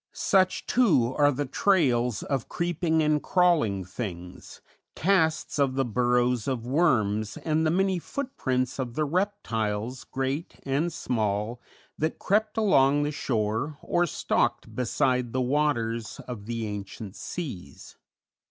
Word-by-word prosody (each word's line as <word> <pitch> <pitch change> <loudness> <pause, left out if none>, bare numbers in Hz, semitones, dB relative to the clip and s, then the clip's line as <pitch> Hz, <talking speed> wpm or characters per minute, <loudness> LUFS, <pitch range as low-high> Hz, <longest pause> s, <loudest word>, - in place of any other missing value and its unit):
Such, 185 -2 +2
too, 160 - +3
are 145 0 +4
the 145 +1 -2
trails 125 - +2
of 135 -5 -2
creeping 170 -2 0
and 150 -1 +2
crawling 155 - +2
things, 90 -3 -7 0.4
casts 160 -5 +1
of 135 -2 +2
the 135 0 +1
burrows 120 0 +1
of 125 -4 -2
worms 110 -8 +1
and 160 0 0
the - - +3
many 190 +2 +1
footprints 135 - -2
of 120 -3 -3
the 155 - +1
reptiles, 125 - -2
great 135 +6 -3
and 145 +6 0
small, 110 -4 -2 0.4
that 155 +1 -1
crept 215 +3 0
along 145 -9 +4
the 145 - -1
shore 120 +1 -1
or 175 0 +1
stalked - - -1
beside 125 0 0
the 130 - +1
waters 125 -5 0
of 110 -5 -8
the 115 -1 -3
ancient 105 0 -6
seas. 95 - -7
130 Hz, 130 wpm, -27 LUFS, 115-160 Hz, 0.4 s, are